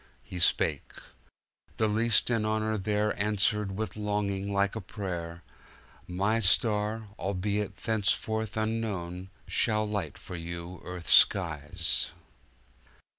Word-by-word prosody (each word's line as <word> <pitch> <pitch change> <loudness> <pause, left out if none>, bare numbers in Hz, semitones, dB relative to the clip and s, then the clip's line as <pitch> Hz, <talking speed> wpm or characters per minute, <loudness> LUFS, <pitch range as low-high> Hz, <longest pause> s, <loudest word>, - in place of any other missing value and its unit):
"He 90 - -7
spake. 85 - +1 0.8
The 110 - +2
least 115 +3 +3
in 115 -3 +1
honor 110 0 0
thereAnswered 105 0 0
with 105 -1 -4
longing 105 -2 -2
like 100 +1 +1
a 110 - -4
prayer,— 90 -4 -6 0.6
"My 100 +5 +1
star, 105 +1 +3
albeit 100 +2 -2
thenceforth 110 0 -1
unknown, 100 -5 -3 0.2
Shall 110 -1 +1
light 100 -8 -3
for 90 - -8
you 85 +1 -7
Earth's 90 -1 -1
skies." 85 -2 +3
105 Hz, 105 wpm, -29 LUFS, 90-110 Hz, 0.8 s, least